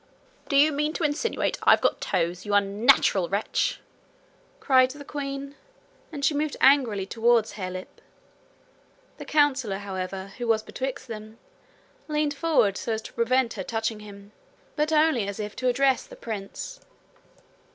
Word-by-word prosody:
'Do 280 - 0
you 300 +2 +6
mean 300 +1 -1
to 335 - -3
insinuate 305 +11 -1
I've - - +6
got - - 0
toes, 175 +2 -1
you 205 -1 -1
unnatural 200 -2 +3
wretch?' 200 +2 -1 0.8
cried 255 -1 +4
the 285 +1 -10
queen; 275 -1 -5 0.6
and 285 -3 -3
she 295 - +3
moved 295 0 -2
angrily 250 -8 +4
towards 230 +1 +2
Harelip. 185 -2 -7 1.2
The - - -7
councillor, 275 -9 +2
however, 190 0 -6
who 240 - -3
was 220 -1 +2
betwixt 260 +1 -5
them, 220 -1 -9 0.7
leaned 300 -1 0
forward 285 -11 +2
so 230 - -2
as 220 0 -4
to - - -10
prevent 240 +1 +1
her 195 - -5
touching 225 +1 -2
him, 200 -1 -12 0.4
but 300 +1 0
only 305 -9 +3
as 200 0 -5
if 210 0 -5
to 255 - -1
address 265 +1 +2
the - - -12
prince. 220 - -7
235 Hz, 150 wpm, -26 LUFS, 205-285 Hz, 1.2 s, you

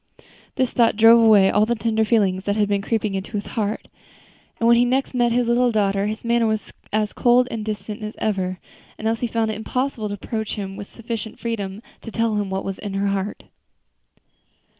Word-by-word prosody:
This 260 -2 0
thought 230 -3 +3
drove 225 +2 +7
away 205 -4 +6
all 210 +1 +3
the 240 - +1
tender 220 0 0
feeling 205 -5 +2
that 200 +1 -2
had 210 -1 +2
been 200 -1 0
creeping 215 -1 -1
into 195 +3 -5
his 205 -1 -3
heart; 215 -1 -2 0.7
and 230 - 0
when 235 - +7
he 240 - +4
next 260 +3 0
met 240 -1 +2
his 240 0 +1
little 240 +1 +3
daughter, 200 -2 +1
his 215 +2 -5
manner 235 -1 +2
was 220 -1 -2 0.2
as 210 0 0
cold 245 +1 +4
and 225 -2 -4
distant 210 +1 -5
as 215 0 -6
ever, 185 -3 -1 0.4
and 220 - -3
Elsie 230 +2 0
found 225 -1 0
it 210 - -5
impossible 250 0 -2
to 205 - -4
approach 220 +2 -4
him 195 -2 -5
with 200 0 -8
sufficient 230 -1 -6
freedom 210 -3 -4 0.2
to - - -8
tell 225 -1 0
him 205 -2 -2
what 190 0 -3
was 195 -1 -4
in 200 -2 -5
her 200 0 0
heart. 195 +1 -3
220 Hz, 205 wpm, -22 LUFS, 205-230 Hz, 0.7 s, drove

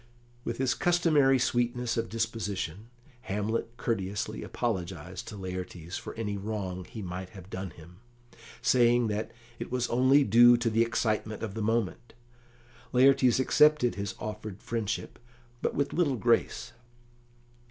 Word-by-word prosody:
With 115 - -3
his 130 -2 +1
customary 155 -5 +3
sweetness 120 -1 0
of 115 0 -2
disposition, 110 -3 -3 0.4
Hamlet 110 +4 -2
courteously 105 -4 -2
apologised 90 -6 -4
to 105 - -7
Laertes 90 -2 -6
for - - -6
any 105 -3 -3
wrong 95 -3 -4
he 110 -4 -8
might 90 0 -5
have 95 +1 -12
done 95 0 -4
him, 85 +2 -15 0.7
saying 120 -2 +4
that 105 +1 -2 0.3
it - - -6
was 125 -1 0
only 130 +4 +5
due 120 +2 +7
to 120 -1 0
the 115 +1 +3
excitement 110 -2 -1
of 110 -3 -4
the 110 - -4
moment. 115 +1 -1 0.8
Laertes 130 -1 +5
accepted 150 -1 +4
his 100 -1 -4
offered 105 -2 -6
friendship, 115 -2 -3 0.4
but - - -1
with 140 0 0
little 150 -7 +1
grace. 115 +2 +1
115 Hz, 135 wpm, -29 LUFS, 100-120 Hz, 0.8 s, due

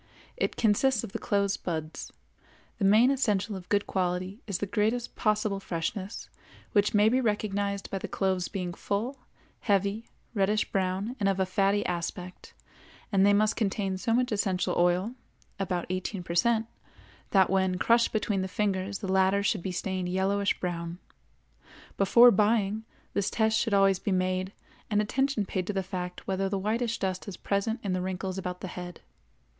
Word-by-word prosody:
It - - -1
consists 230 +2 +2
of - - -6
the - - -4
closed 200 -1 0
buds. 160 -2 -4 0.7
The 200 - +1
main 220 +6 +6
essential 215 -6 0
of 180 -2 -9
good 205 0 +2
quality 185 +3 -2
is 200 -4 -1
the 205 - -2
greatest 220 +4 -1
possible 215 -2 +1
freshness, 190 +3 -4 0.4
which 205 0 +2
may 205 +1 +5
be 255 +4 +3
recognized 205 -3 -1
by 195 - -2
the - - -5
cloves 190 -2 0
being 180 -3 -4
full, 230 +10 -3 0.4
heavy, 200 +2 0 0.3
reddish 210 0 +1
brown, 195 +5 -1
and 200 -2 +2
of 195 -1 0
a 190 - +3
fatty 195 +2 +1
aspect, 180 +1 -5 0.6
and 195 -2 +4
they 200 - +6
must 210 +1 +3
contain 195 -3 -1
so 190 +5 -2
much 245 +1 +2
essential 195 -3 0
oil 180 +6 +2 0.5
(about 180 -3 -1
18 185 +1 -3
per 170 - -5
cent) 225 +5 +3 0.6
that 190 -3 +4
when 190 -1 +2
crushed 235 +4 +3
between 210 -3 0
the 190 - -2
fingers 195 0 -1
the - - -3
latter 190 +1 +3
should 205 -2 +1
be 190 - -3
stained 185 0 -2
yellowish 195 +2 +1
brown. 170 -1 -3 1.0
Before 235 +5 +7
buying, 215 0 +2 0.3
this 200 -1 0
test 220 -1 +2
should 225 -3 +1
always 195 -1 +4
be 200 - -2
made, 185 0 0 0.4
and 210 - +2
attention 245 +1 0
paid 185 -1 -3
to 210 - -1
the 195 -1 -1
fact 180 -1 -5
whether 195 0 -1
the 200 - -1
whitish 225 +4 -1
dust 185 0 -3
is 190 -3 -6
present 205 +4 -1
in 195 -3 -1
the 185 - -1
wrinkles 190 +1 -3
about 180 -1 -5
the - - -4
head. 175 -1 -8
195 Hz, 170 wpm, -28 LUFS, 185-210 Hz, 1.0 s, Before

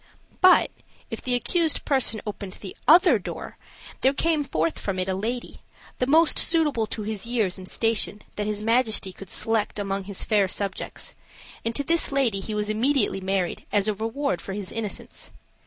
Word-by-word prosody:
But, 370 0 +6 0.4
if - - -5
the 250 -1 +1
accused 325 +5 +1
person 260 -6 +2
opened 200 -2 -6
the 195 - -9
other 355 - +7
door, - - -7 0.4
there 270 +1 +3
came 320 -1 +1
forth 165 - -1
from 195 -2 -3
it 185 0 -1
a 190 - 0
lady, 230 +6 -4 0.4
the 250 - +1
most 320 +3 +5
suitable 295 -9 +2
to 215 - -5
his 215 0 -4
years 215 -6 0
and 185 - -9
station 225 -2 0
that 210 0 -2
his 210 0 -2
majesty 225 -4 +2
could 195 -1 -11
select 225 -2 0
among 195 -1 -2
his 200 -1 -1
fair 205 -3 +3
subjects, 195 +1 -3 0.5
and 230 0 -2
to 285 - +2
this 330 +1 0
lady 255 -8 +1
he 210 +2 -5
was 210 0 -1
immediately 220 -1 +1
married, 190 -1 -1
as 205 0 +2
a 215 - +2
reward 225 - -2
of - - -15
his 200 -2 -5
innocence. 215 -3 -5
215 Hz, 180 wpm, -25 LUFS, 195-260 Hz, 0.5 s, other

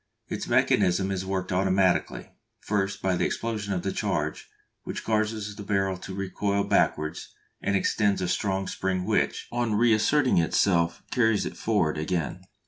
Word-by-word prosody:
Its - - -4
mechanism 95 +2 +2
is 95 -1 -3
worked 95 -1 -2
automatically; 95 0 +1 0.3
first 100 -2 -2
by 95 -1 +2
the - - 0
explosion 110 -3 -2
of 90 -2 -1
the - - -1
charge, - - -2 0.3
which - - -6
causes 110 -1 -1
the 105 - -8
barrel 95 -1 0
to 95 - -9
recoil 100 +1 -1
backwards 80 -3 0 0.3
and 100 - 0
extends 100 +1 +1
a 90 - -1
strong 95 +1 -1
spring 95 -1 -2
which, - - 0
on 120 -3 0
reasserting 120 +3 +3
itself, 85 0 +2
carries 110 -4 +2
it - - -5
forwards 85 -9 0
again. 85 +2 -2
95 Hz, 150 wpm, -26 LUFS, 90-105 Hz, 0.3 s, reasserting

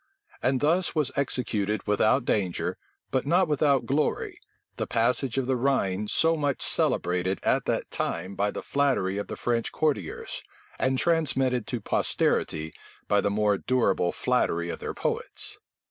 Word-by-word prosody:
And 130 0 +1
thus 170 +5 +2
was 150 -4 +1
executed 110 -6 -1
without 110 +4 +2
danger, 90 -5 0 0.4
but 130 +1 0
not 180 +3 +4
without 145 -3 +2
glory, 145 +3 -1 0.4
the - - -2
passage 120 +2 +1
of 135 - +1
the 130 +1 +1
Rhine 105 -6 0
so 165 +8 +3
much 145 -3 -1
celebrated 90 +2 0
at - - +2
that - - -1
time 90 +4 -3
by 100 +1 0
the - - -5
flattery 130 -9 +1
of 100 - -4
the - - -5
French 120 -1 -1
courtiers, 140 - -2 0.4
and 130 0 +1
transmitted 135 -8 +1
to 120 -3 -3
posterity 80 -5 0 0.3
by 105 - +3
the - - +1
more 105 -1 +1
durable 100 -8 +1
flattery 85 +1 0
of - - -4
their - - -5
poets. - - -3
125 Hz, 150 wpm, -27 LUFS, 100-140 Hz, 0.4 s, not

